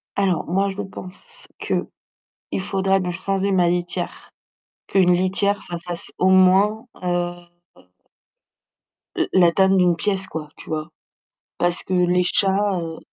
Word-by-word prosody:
Alors, 195 -4 +1
moi, 195 +3 +1
je 195 +1 -4
pense 205 - -6
qu'il - - -4 0.5
faudrait 195 0 +1
lui 180 -1 -2
changer 195 +2 -1
ma 180 -2 +3
litière 175 0 -3 0.6
qu'une 180 -2 +4
litière, 190 +3 +1
ça 175 - -6
fasse 175 -1 -6
au 185 - +3
moins, 190 +5 +4 0.2
heu 175 0 0 1.8
la - - +1 0.2
la 170 - +6
taille 190 +2 +3
d'une 180 -2 +4
pièce 195 -1 -1
quoi, 155 -2 -6
tu - - -12
vois? 155 -1 -3 0.7
Parce 175 0 0
que 185 - -3
les 180 0 +3
chats, 200 +2 +2
heu, 165 -1 -6
185 Hz, 135 wpm, -22 LUFS, 175-195 Hz, 1.8 s, la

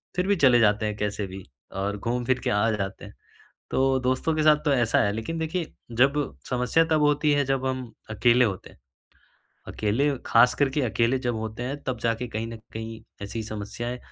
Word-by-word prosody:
फिर 180 +1 0
भी 200 - +3
चले 130 -8 +5
जाते 105 -1 +3
हैं 105 -1 -2
कैसे 105 -1 -2
भी, 95 0 -9 0.3
और 100 +2 -2
घूम 120 +4 -2
फिर 130 +1 +1
के - - 0
आ 105 +3 +2
जाते 100 -2 -4
हैं। - - -12 0.6
तो 135 0 +2
दोस्तों 130 +5 +1
के 155 - +1
साथ 155 -1 +7
तो 145 - +3
ऐसा 120 -3 +2
है। 100 - +1
लेकिन 115 +10 -4
देखिए 160 +1 -3 0.3
जब 135 +3 +5 0.4
समस्या 125 +6 +2
तब 160 -2 +1
होती 150 0 +3
है, 145 0 +2
जब 135 0 -1
हम 130 -2 -3 0.2
अकेले 120 +3 +4
होते 95 -4 -4
हैं। - - -19 0.9
अकेले 115 +8 0 0.2
ख़ासकर 125 +4 +4
के 145 +2 -1
अकेले 120 +1 +1
जब 120 -2 -2
होते 110 +2 -5
हैं 135 +3 -3
तब 130 -3 -3
जाके 115 +1 -1
कहीं 110 +1 -4
न 115 0 -7 0.2
कहीं 110 0 -6 0.2
ऐसी 110 +3 -4
समस्याएँ 110 +3 -5
120 Hz, 200 wpm, -25 LUFS, 110-135 Hz, 0.9 s, साथ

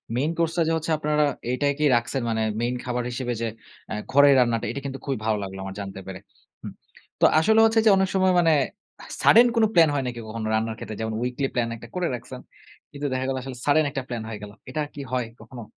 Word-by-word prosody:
Main 145 +6 0
course 165 -1 +1
টা - - +3
যে 165 - +1
হচ্ছে, 160 +1 -3
আপনারা 150 0 +1 0.3
এটাই 140 +2 +1
কি - - 0
রাখছেন, 120 +3 -1
মানে 110 0 0 0.2
মেইন 120 +1 -1
খাবার 125 0 -2
হিসেবে 120 0 -3
যে 115 - 0 0.4
এ্যা - - -3 0.2
ঘরের 140 +1 +7
রান্নাটা, 115 -3 +1
এটা 140 - -4
কিন্তু 135 0 -5
খুবই 135 -2 -1
ভালো 110 -1 +1
লাগলো 95 0 -7
আমার 95 0 -7
জানতে 95 -1 -7
পেরে। 95 -1 -7 0.4
হুম। - - -7 0.5
তো - - +7
আসলে 220 +7 +4
হচ্ছে 225 0 +3
যে, - - +7
অনেক 190 -1 +2
সময় 190 -1 +3
মানে, 165 -2 +4 0.7
সাডেন 235 +2 +7
কোন 230 - +4
প্ল্যান 165 -3 +6
হয় 140 -2 0
নাকি, 120 -1 -5
কখনো 110 0 -4
রান্নার 110 0 0
ক্ষেত্রে, 110 - -7
যেমন 110 0 -2
উইকলি 125 +2 -1
প্ল্যান 120 -2 0
১ - - -12
টা - - -8
করে 180 -1 0
রাখছেন। 120 - -9 0.5
কিন্তু 145 0 -6
দেখা 130 0 -1
গেল, 135 - -1
আসলে 130 -1 -7
সাডেন 150 +1 +4
একটা 135 -1 -3
প্লান 120 -2 -4
হয়ে 110 -2 -6
গেল। 105 - -8 0.2
এটা 155 +4 -2
কি 145 - -7
হয়, 125 -2 0 0.2
কখনো? 115 +2 -10
130 Hz, 230 wpm, -24 LUFS, 115-150 Hz, 0.7 s, ঘরের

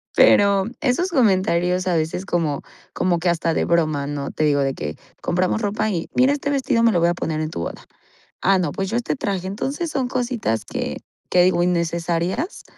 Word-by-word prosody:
Pero, 200 -1 +5 0.2
esos 305 +7 +1
comentarios 185 - +2
a 175 - +2
veces 160 +4 -1
como 160 -6 -1 0.3
como 175 -2 +1
que 175 +1 +1
hasta 165 -1 0
de - - 0
broma, 155 -4 +1
¿no? 145 -1 -4
Te 155 - -2
digo 145 -1 +3
de 135 -1 0
que, 75 +1 -5 0.3
compramos 185 +5 0
ropa 210 +1 0
y, 170 -5 -3
mira, 260 +3 +4
este 285 0 -2
vestido 255 -4 +1
me 230 - +5
lo 175 - +2
voy 170 +1 +3
a - - +1
poner 160 -2 -3
en 155 - -2
tu 85 - -5
boda. - - -5 0.6
Ah, 195 +1 +4
no, 160 -5 -1
pues 195 0 -3
yo 235 - 0
este 240 - -1
traje. 190 -5 -2
Entonces, 280 - -3
son 265 -4 -1
cositas 240 - -1
que - - -4 0.3
que 180 -1 +5
digo 175 -1 +3
innecesarias, 170 - -1
180 Hz, 200 wpm, -21 LUFS, 165-230 Hz, 0.6 s, Pero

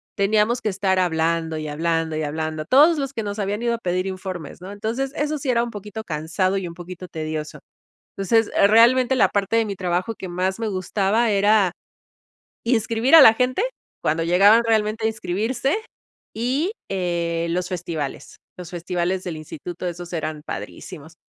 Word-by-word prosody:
teníamos 215 +4 +2
que 215 - 0
estar 190 -1 0
hablando 165 -2 0
y 155 0 -4
hablando 165 +1 -1
y 155 - -2
hablando. 155 +1 -3
Todos 300 - +5
los 275 -1 -2
que 225 - -3
nos 205 0 -4
habían 205 +2 -2
ido 235 -1 +1
a - - -5
pedir 185 -2 -1
informes, 185 -4 -6
¿no? 190 +2 -8
Entonces, 230 +6 -3
eso 300 +1 -1
sí 270 -1 -4
era 235 -1 +3
un 240 - -4
poquito 210 +1 -7
cansado 180 +4 -1
y 185 -2 -3
un 170 - -8
poquito 180 +1 -9
tedioso. 155 -2 -5 0.6
Entonces, 225 +3 +2 0.2
realmente 240 +4 +5
la 255 - +4
parte 200 +2 0
de 225 - +3
mi 200 -2 -4
trabajo 180 +4 -1
que 190 - -8
más 185 +3 -1
me 225 -1 -2
gustaba 200 +4 0
era 205 -2 +3 0.9
inscribir 230 +2 +1
a 320 - +11
la 225 - +9
gente 255 - 0 0.4
cuando 160 +2 0
llegaban 200 +7 +5
realmente 220 0 +1
a - - +4
inscribirse 225 - -1 0.6
y, 265 - -1 0.2
eh, 170 -3 -1
los 180 +1 -1
festivales, 165 -6 -5 0.2
los 180 0 -9
festivales 180 +1 -2
del 170 -3 -4
instituto, 170 +3 -7
esos 175 0 -6
eran 155 -2 -4
padrísimos, 160 -1 -8
190 Hz, 170 wpm, -22 LUFS, 170-225 Hz, 0.9 s, a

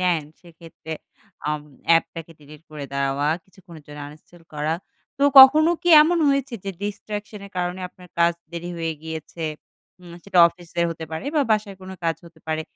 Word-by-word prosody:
নেন। 175 -4 +2 0.2
সেক্ষেত্রে 165 -2 -11 0.6
আম 150 0 -1 0.3
অ্যাপটাকে 165 0 +1
delete 150 +2 -15
করে 150 -2 -7
দেওয়া, 140 +1 0 0.2
কিছুক্ষণের 170 -4 -15
জন্য 150 0 -11
uninstall 160 +3 -17
করা। 150 +2 -1 0.4
তো - - -1 0.2
কখনো 305 +5 +9
কি 350 - 0
এমন 340 +2 +2
হয়েছে 275 -2 0
যে, 195 - -2
distraction 205 0 -5
এর - - -16
কারণে 180 +1 -2
আপনার 180 0 -17
কাজ 170 0 +4 0.2
দেরি 175 +1 -5
হয়ে 165 -1 -2
গিয়েছে? 160 +1 -6 0.6
উম 175 -1 -13
সেটা 195 -2 0
অফিসে 170 0 -7
হতে 160 0 -6
পারে 160 - -4
বা 300 - +3
বাসার 210 -2 +1
কোন 185 0 -10
কাজ 165 -1 +1
হতে 165 -1 -17
পারে। 160 0 -1
170 Hz, 170 wpm, -23 LUFS, 160-195 Hz, 0.6 s, কখনো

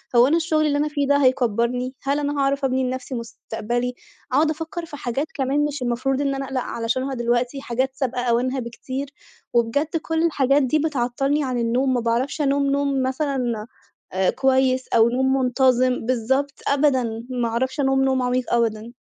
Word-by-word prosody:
هو 240 +2 +7
أنا 325 +4 +3
الشُّغل 315 -2 +1
اللي 290 -1 +1
أنا 300 +1 +1
فيه 285 -2 -1
ده 285 0 +4
هيكَبّرني؟ 250 -1 +1
هل 280 +2 0
أنا 290 0 -2
هاعرف 275 0 +1
أبني 260 0 +1
لنفسي 255 +1 -3
مُستقبلي، 235 +1 -3 0.4
أقعُد 300 +4 +3
أفَكّر 325 +2 -4
في 295 -2 -9
حاجات 265 +4 -2
كمان 280 +1 +1
مش 290 -2 -4
المفروض 255 +3 0
إن 275 -1 0
أنا 270 0 -3
أقلق 260 -1 -2
علشانها 255 +4 -2
دلوقتي، 245 +2 -1
حاجات 260 +2 -2
سابقة 255 -3 -2
أوانها 250 +2 +1
بكتير، 260 +3 -5 0.4
وبجد 285 +8 +1
كُلّ 325 0 -1
الحاجات 280 -2 +3
دي 305 +4 +2
بتعطّلني 275 0 0
عن 255 -2 -2
النوم، 250 +3 +1
ما 245 - +1
باعرفش 240 +6 0
أنام 280 0 +2
نوم 280 -1 +1
مثلًا 260 -5 -1 0.5
آآ 190 0 +2
كويس، 260 -1 +2
أو 230 0 +4
نوم 265 +2 +1
مُنتظم، 255 -1 +2
بالضبط، 265 +3 0
أبدًا، 260 -5 +1
ما 245 -2 -1
أعرفش 260 +5 -2
أنام 270 -1 +2
نوم 265 -1 +2
عميق 250 0 -1
أبدًا. 230 0 0
260 Hz, 175 wpm, -22 LUFS, 240-280 Hz, 0.5 s, هو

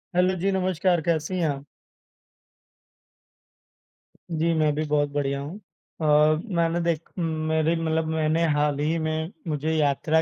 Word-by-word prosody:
Hello 185 +1 +3
जी, 195 +3 +1
नमस्कार। 185 -2 +1
कैसी 165 +3 -1
हैं 165 - +2
आ 140 - -1 2.7
जी, 165 +1 +1
मैं 155 -2 +2
भी 155 - -1
बहुत 145 -1 +1
बढ़िया 140 -1 -1
हूँ। 150 +7 -7 0.4
अ, - - -2 0.5
मैंने 170 0 +1
देख 170 -2 -1
मेरी 160 0 0
मतलब 160 0 0
मैंने 160 +1 +1
हाल 145 -1 +1
ही 155 +3 +1
में 160 +1 -2 0.2
मुझे 155 0 -1
यात्रा 155 +1 +2
160 Hz, 135 wpm, -25 LUFS, 150-170 Hz, 2.7 s, Hello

